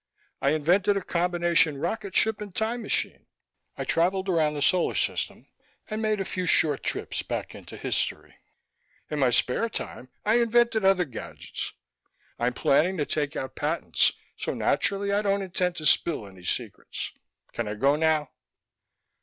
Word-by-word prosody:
"I 140 +2 +3
invented 185 +6 +3
a 195 - -3
combination 175 -3 +2
rocket 200 +5 -3
ship 220 -1 +3
and 205 -3 -7
time 230 +2 -1
machine. - - -2 0.5
I - - -2
traveled 190 +3 +1
around 155 -4 +2
the 145 - -3
solar 180 +2 +3
system - - -1 0.5
and 215 +1 -2
made 215 -1 +1
a 195 - -1
few 185 -1 -3
short 150 -5 +3
trips - - -2
back - - -4
into - - -10
history. - - -2 0.8
In 150 - -1
my 130 -3 +4
spare 125 - +2
time 130 - -6 0.2
I 220 +3 +4
invented 235 -2 +3
other 190 -2 +4
gadgets. 130 -6 -7 0.7
I'm 120 +1 +1
planning 165 +9 +2
to 150 - 0
take 150 0 -1
out 130 - -4
patents, - - +1 0.2
so - - -3
naturally 200 0 +1
I 200 +1 +2
don't 200 -1 +1
intend 180 -1 -1
to 155 - -5
spill 150 -3 +3
any 95 -2 -13
secrets. 110 -1 -4 0.4
Can 120 -2 -2
I 105 - -3
go 140 +7 +3
now?" 155 -2 +1
175 Hz, 160 wpm, -27 LUFS, 145-200 Hz, 0.8 s, my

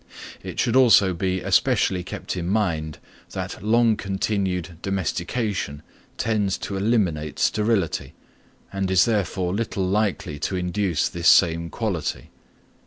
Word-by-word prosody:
It - - -7
should 120 -1 +1
also 110 -7 +6
be 95 +1 -1
especially 90 -2 +2
kept 95 - -5
in 85 -2 -3
mind, 85 -7 -1 0.4
that - - -5
long 115 +1 +3
continued 95 -4 -2
domestication 95 -3 -2 0.3
tends 105 -4 0
to 100 - -5
eliminate 95 -8 0
sterility, 105 -5 0 0.6
and 95 -1 -1
is 95 0 +5
therefore 95 -5 -1
little 100 -3 -2
likely 95 -6 -1
to 95 - -2
induce 90 -2 0
this 85 -1 -2
same 85 -2 +5
quality. 100 -7 -3
95 Hz, 120 wpm, -23 LUFS, 85-105 Hz, 0.6 s, also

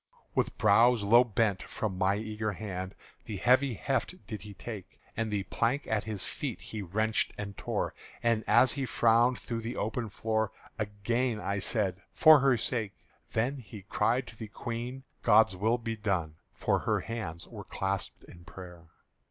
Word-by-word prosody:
With - - 0
brows 115 +2 +5
low 120 +4 +7
bent, 110 -4 +1
from 105 -4 -3
my 95 +1 +3
eager 105 0 -3
hand 95 -2 -5 0.3
The 105 - -5
heavy 125 +4 +3
heft 135 - -1
did 110 -3 -6
he 105 -1 -10
take; 100 -4 -8 0.2
And 115 0 -1
the 105 -2 -1
plank 120 +8 0
at 110 -2 -1
his 105 -3 -2
feet - - -4
he 110 - -6
wrenched 110 +4 0
and 100 -1 -5
tore; - - -2 0.3
And 115 -2 +2
as 130 - +6
he 135 -2 -1
frowned 120 +2 +4
through 115 -1 -4
the 115 +2 -5
open 110 +1 -2
floor, 110 +1 -1 0.3
Again 110 +3 -1
I 100 -1 -1
said, 95 -3 0
"For 155 -2 +8
her 135 -2 +4
sake!" 110 -3 -2 0.4
Then 125 +6 +1
he 110 -5 -10
cried 120 +5 +1
to - - -12
the 110 0 -7
Queen, 120 +4 -5 0.2
"God's 110 -3 +5
will 110 +6 +2
be 115 -1 -4
done!" 90 -7 -1
For - - 0
her - - 0
hands 110 -8 -5
were - - -9
clasped 95 -1 -3
in 85 - -14
prayer. 90 -1 -11
110 Hz, 170 wpm, -30 LUFS, 100-120 Hz, 0.4 s, For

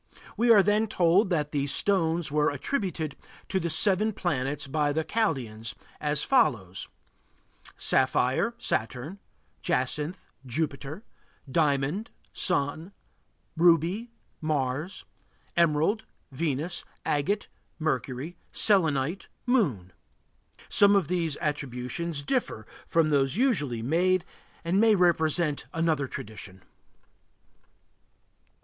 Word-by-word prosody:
We 240 +1 +2
are 210 -4 +8
then 210 +2 +2
told 185 0 +3
that 150 -5 0
these 140 -1 -1
stones 170 -5 +1
were 150 0 +2
attributed 160 - -3 0.3
to 190 - +1
the 170 -1 -2
seven 200 +6 +3
planets 145 -5 -1
by 145 +1 0
the 160 +2 0
Chaldæans, 115 - -2 0.2
as 150 -1 +1
follows: 110 - +1 0.9
Sapphire 130 - +1
Saturn 130 - -3 0.4
Jacinth 150 +7 -1 0.2
Jupiter 145 - -3 0.4
Diamond 145 - 0 0.2
Sun 165 +1 0 0.6
Ruby 175 +7 +3 0.3
Mars 150 +2 -2 0.5
Emerald 170 +6 +2 0.3
Venus 155 +4 -2 0.2
Agate 175 +9 0 0.3
Mercury 150 0 -2 0.2
Selenite 165 -4 +2 0.2
Moon 145 - +1 0.7
Some 205 0 +6
of 185 -6 +1
these 165 -5 0
attributions 145 +2 -3
differ 150 - -2 0.2
from 160 -2 +2
those 135 0 +2
usually 145 - +1
made 175 +7 +2 0.4
and 185 +4 +2
may 225 -1 +5
represent 165 -4 +1
another 160 -4 +1
tradition. 100 -5 -9
160 Hz, 95 wpm, -27 LUFS, 140-185 Hz, 0.9 s, are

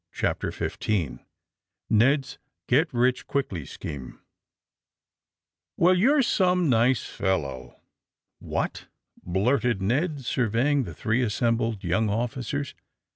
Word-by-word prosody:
CHAPTEE - - -1
XV - - -4 1.1
KED^S 130 +5 +2 0.3
GET 150 +7 +4
EICH 125 0 +1
QUICKLY 95 - -2
SCHEME 70 -4 -8 1.6
ELL, 170 - +5
you^re 265 +8 +4
some 180 -5 +2
nice 120 -1 +3
fellow! 70 -10 -3 0.6
What?" - - -3 0.4
blurted 115 +5 +1
ISTed, 135 - -1
surveying 125 +4 +1
the 85 -5 -8
three 110 +8 0
assembled 115 -2 0
young 95 +5 +1
officers. 125 +5 -2
120 Hz, 95 wpm, -26 LUFS, 105-140 Hz, 1.6 s, ELL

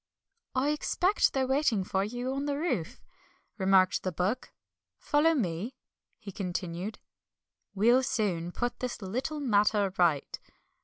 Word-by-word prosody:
"I 265 +3 +2
expect 355 +6 +2
they're 265 -1 +1
waiting 265 -6 +2
for 190 +1 0
you 245 +5 -3
on 275 +1 -2
the 285 -1 -1
roof," 255 - -2 0.6
remarked 190 -1 +4
the 185 - -2
Book. 185 +9 -2 0.5
"Follow 320 +3 +2
me," 200 - -2 0.4
he 200 - -9
continued, 180 +1 -4 0.8
"we'll 235 +6 +5
soon 185 -9 -1
put 245 +6 -3
this 250 -4 -4
little 255 +10 -3
matter 210 -6 +2
right." 165 -6 +2
215 Hz, 125 wpm, -29 LUFS, 185-265 Hz, 0.8 s, we'll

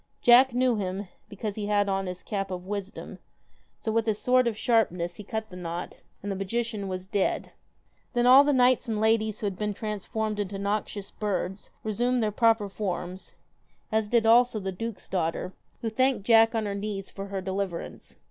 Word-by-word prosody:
Jack 250 +2 +7
knew 250 -1 +2
him, 190 0 -3 0.2
because 205 0 -4
he 205 0 -4
had 205 -1 +2
on 195 -1 -1
his 180 0 -6
cap 195 -2 -3
of 180 -1 -5
wisdom, 200 0 -6 0.6
so 220 - -3
with 225 0 +1
his 215 -2 +1
sword 250 +2 +3
of 225 -2 -1
sharpness, 180 -8 +1
he 210 - -8
cut 220 +1 -5
the - - -9
knot, 175 -1 -5 0.3
and 205 - -3
the - - -2
magician 210 +1 -2
was 185 -1 -4
dead. 195 0 -1 0.6
Then 240 -1 +2
all 260 +3 +9
the 290 - +2
knights 255 -2 +3
and 220 -2 -1
ladies 220 -1 +1
who - - -2
had 195 -2 -3
been 210 -1 -1
transformed 215 0 -3
into 200 -1 -3
noxious 200 0 -3
birds 195 -2 -3
resumed 240 +3 0
their 215 - +1
proper 225 -1 +3
forms, 185 -2 -5 0.6
as 220 -1 +1
did 235 -1 +3
also 235 0 +5
the 190 -1 -3
duke's 225 +3 -6
daughter, 180 0 -2 0.3
who 225 - -1
thanked 255 -3 +1
Jack 225 0 +5
on 220 -1 0
her 200 - -2
knees 200 -1 -4
for 195 0 -7
her 195 -1 -3
deliverance. 190 -2 -4
210 Hz, 190 wpm, -27 LUFS, 195-225 Hz, 0.6 s, all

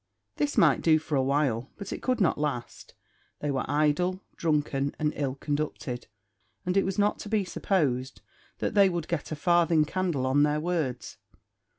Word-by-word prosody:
This 290 -1 -1
might - - +5
do 160 -1 +5
for 155 -1 -3
a 135 - +3
while, 135 -3 0
but 200 -1 -6
it - - -6
could 255 -2 0
not 180 -7 +2
last. 140 -6 -4 0.4
They 145 - -1
were 135 - -1
idle, 155 +6 +1
drunken, 145 -3 0
and 150 0 0
ill 135 -2 -2
conducted; 145 -4 -3 0.6
and 180 +1 0
it 195 - +3
was 190 0 -2
not 205 0 +2
to 210 - -7
be 210 -2 +1
supposed 135 -9 -1 0.4
that - - -2
they 200 -2 +6
would 170 -3 -3
get 170 -3 -3
a - - -1
farthing 165 -1 +3
candle 170 -5 -1
on 135 +2 +3
their 150 +1 +2
words. 160 -6 -2
150 Hz, 180 wpm, -28 LUFS, 140-180 Hz, 0.6 s, they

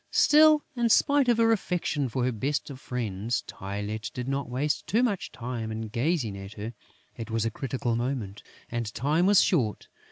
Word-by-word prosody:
Still, 305 0 +6
in 240 -1 +1
spite 285 +3 +4
of 235 - +4
her 225 0 +4
affection 175 - 0
for 125 +1 -1
her 125 - +1
best 140 +6 -2
of 130 - -9
friends, 115 -2 -2
Tylette 105 0 -5
did 125 0 -4
not 135 -1 -2
waste 140 +4 -1
too 225 +9 +2
much 205 -7 -1
time 115 -2 -5
in 110 0 -4
gazing 120 - 0
at 95 +1 -8
her: 110 +2 -6 0.4
it 115 0 -7
was 115 0 0
a 115 - 0
critical 125 0 -2
moment; 120 -5 -3 0.3
and 115 -2 -2
time 150 - +2
was 200 -1 +6
short. 120 - 0
125 Hz, 185 wpm, -27 LUFS, 110-170 Hz, 0.4 s, Still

